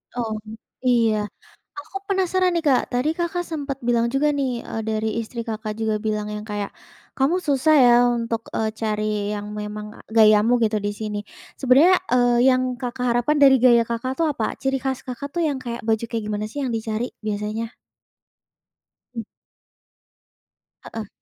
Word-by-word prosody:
Oh 220 Hz, -3 st, -2 dB, 0.5 s
iya. 225 Hz, -4 st, +3 dB, 0.5 s
Aku 310 Hz, +7 st, -7 dB
penasaran 370 Hz, -1 st, +2 dB
nih 330 Hz, -, -1 dB
Kak, 265 Hz, -3 st, +4 dB
tadi 250 Hz, +5 st, +1 dB
Kakak 345 Hz, +1 st, -2 dB
sempat 285 Hz, -4 st, -4 dB
bilang 235 Hz, -1 st, +2 dB
juga 295 Hz, +2 st, +3 dB
nih, 260 Hz, -4 st, -1 dB
eee, 225 Hz, -, -4 dB
dari 220 Hz, 0 st, 0 dB
istri 235 Hz, +1 st, -6 dB
Kakak 215 Hz, -1 st, -4 dB
juga 220 Hz, -1 st, 0 dB
bilang 215 Hz, -1 st, -1 dB
yang 210 Hz, -, -4 dB
kayak, 205 Hz, -1 st, -4 dB, 0.5 s
"Kamu 280 Hz, +7 st, +2 dB
susah 300 Hz, +2 st, +3 dB
ya 245 Hz, -2 st, +7 dB
untuk, 230 Hz, -1 st, -2 dB
eee, 220 Hz, 0 st, 0 dB
cari 215 Hz, -1 st, -2 dB
yang 210 Hz, 0 st, -5 dB
memang 210 Hz, 0 st, -5 dB
a -, -, -12 dB
gayamu 220 Hz, +2 st, +5 dB
gitu 215 Hz, -1 st, +1 dB
di 205 Hz, -, -1 dB
sini." 210 Hz, -1 st, -4 dB, 0.4 s
sebenarnya, 285 Hz, +8 st, +6 dB, 0.2 s
eee, 245 Hz, 0 st, +4 dB
yang 255 Hz, 0 st, +3 dB, 0.2 s
Kakak 250 Hz, 0 st, -3 dB
harapan 245 Hz, +6 st, +1 dB
dari 270 Hz, -1 st, +8 dB
gaya 240 Hz, -2 st, +6 dB
Kakak 235 Hz, +3 st, -3 dB
tuh 330 Hz, -, +3 dB
apa, -, -, -2 dB
ciri 270 Hz, 0 st, +1 dB
khas 265 Hz, -1 st, -2 dB
Kakak 255 Hz, +3 st, -6 dB
tuh 345 Hz, -, +1 dB
yang 280 Hz, -3 st, -1 dB
kayak 235 Hz, -1 st, -5 dB
baju 220 Hz, 0 st, +1 dB
kayak 225 Hz, -2 st, -3 dB
gimana 210 Hz, 0 st, -2 dB
sih 285 Hz, +4 st, -4 dB
yang 240 Hz, -, -2 dB
dicari 225 Hz, +2 st, -3 dB
biasanya? 215 Hz, +2 st, -3 dB, 1.5 s
Mmm. 230 Hz, -, -3 dB, 1.6 s
Heeh. 220 Hz, -2 st, -7 dB
235 Hz, 165 wpm, -23 LUFS, 215-270 Hz, 1.6 s, dari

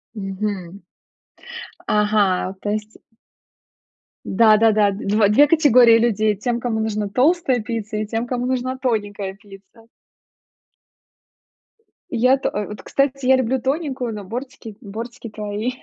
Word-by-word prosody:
Мгм. 195 Hz, -2 st, -5 dB, 1.1 s
Ага, 210 Hz, -3 st, +1 dB
то 205 Hz, -, -3 dB
есть 215 Hz, +1 st, -5 dB, 1.3 s
Да-да-да, 215 Hz, 0 st, +4 dB
2, 205 Hz, +1 st, +1 dB
2 285 Hz, +8 st, +5 dB
категории 250 Hz, -7 st, +6 dB
людей: 215 Hz, -2 st, +1 dB
тем, 240 Hz, +3 st, -2 dB
кому 235 Hz, -2 st, -2 dB
нужна 215 Hz, -1 st, -2 dB
толстая 265 Hz, -, +2 dB
пицца 220 Hz, -1 st, -4 dB
и 215 Hz, -, -2 dB
тем, 225 Hz, +3 st, -3 dB
кому 245 Hz, 0 st, -2 dB
нужна 255 Hz, 0 st, -2 dB
тоненькая 205 Hz, -6 st, -2 dB
пицца. 200 Hz, +3 st, -17 dB, 2.2 s
Я 255 Hz, +3 st, +3 dB
то -, -, -2 dB
э, 210 Hz, 0 st, -3 dB
вот, 210 Hz, -, -9 dB
кстати, 275 Hz, -1 st, -1 dB
я 265 Hz, -, +6 dB
люблю 260 Hz, 0 st, -1 dB
тоненькую, 265 Hz, -4 st, -2 dB
но 210 Hz, -1 st, -7 dB
бортики, 230 Hz, 0 st, -8 dB
бортики 230 Hz, +3 st, -8 dB
твои. 210 Hz, +3 st, -4 dB
220 Hz, 120 wpm, -20 LUFS, 210-250 Hz, 2.2 s, категории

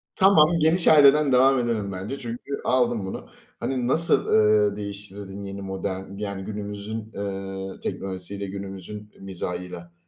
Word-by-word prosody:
Tamam, 175 Hz, -4 st, +5 dB
Geniş 165 Hz, +3 st, +7 dB
Aile'den 145 Hz, -1 st, +6 dB
devam 130 Hz, +1 st, +4 dB
edelim 110 Hz, -5 st, -2 dB
bence 95 Hz, +9 st, -6 dB
çünkü 120 Hz, +4 st, -6 dB
aldım 120 Hz, -5 st, +1 dB
bunu. 95 Hz, -, -7 dB, 0.3 s
Hani, 125 Hz, -2 st, -2 dB
nasıl, 165 Hz, +5 st, +4 dB
ııı, 105 Hz, -1 st, +3 dB
değiştirirdin 100 Hz, -1 st, -6 dB
yeni 100 Hz, 0 st, -7 dB
modern 95 Hz, 0 st, -5 dB
yani 100 Hz, -2 st, -5 dB
günümüzün, 105 Hz, +1 st, -6 dB
eee, 95 Hz, -1 st, -6 dB
teknolojisiyle 95 Hz, +1 st, -5 dB
günümüzün 100 Hz, +2 st, -8 dB
mizahıyla? 90 Hz, -2 st, -6 dB
100 Hz, 125 wpm, -24 LUFS, 95-125 Hz, 0.3 s, Geniş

